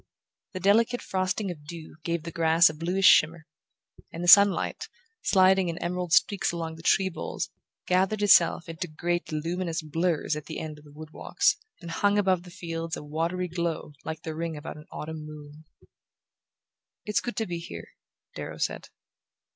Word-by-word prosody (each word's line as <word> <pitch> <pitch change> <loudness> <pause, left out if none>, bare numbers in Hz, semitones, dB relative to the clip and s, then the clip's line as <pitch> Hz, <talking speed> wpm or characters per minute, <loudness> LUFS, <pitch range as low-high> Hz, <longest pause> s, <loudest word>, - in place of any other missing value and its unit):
The 185 - -4
delicate 225 +6 +3
frosting 185 +1 -1
of 150 -4 -10
dew 160 -1 -9
gave 170 -1 -2
the 165 - -6
grass 165 0 +4
a - - -12
bluish 180 +5 -1
shimmer, 160 -3 +5 0.7
and 170 - -6
the - - -2
sunlight, 200 +2 +6 0.3
sliding 190 -1 +4
in 165 - -4
emerald 180 0 -3
streaks 195 +3 +3
along 165 -1 -4
the 160 - -11
tree 190 +3 +3
boles, 175 - -5 0.3
gathered 190 +3 +1
itself 175 -4 +5
into 165 +2 -5
great 175 +2 -2
luminous 165 +2 -2
blurs 165 0 0
at 150 - -7
the 160 - -6
end 155 -1 -6
of 150 - -19
the 145 - -15
wood 155 +1 -11
walks, - - +1 0.3
and 170 -1 -7
hung 205 +4 +2
above 190 -3 +2
the 180 - -13
fields 165 -2 -5
a - - -8
watery 165 +5 -2
glory 170 -3 -3
like 160 0 -6
the 160 - -4
ring 165 0 -4
about 150 +2 -7
an 150 - -13
autumn 155 0 -6
moon. 150 0 -11 1.4
"It's 210 - 0
good 240 - -5
to 225 - -1
be 175 -3 -4
here," 85 - -9 0.4
Darrow - - -7
said. - - -3
170 Hz, 175 wpm, -27 LUFS, 160-185 Hz, 1.4 s, sunlight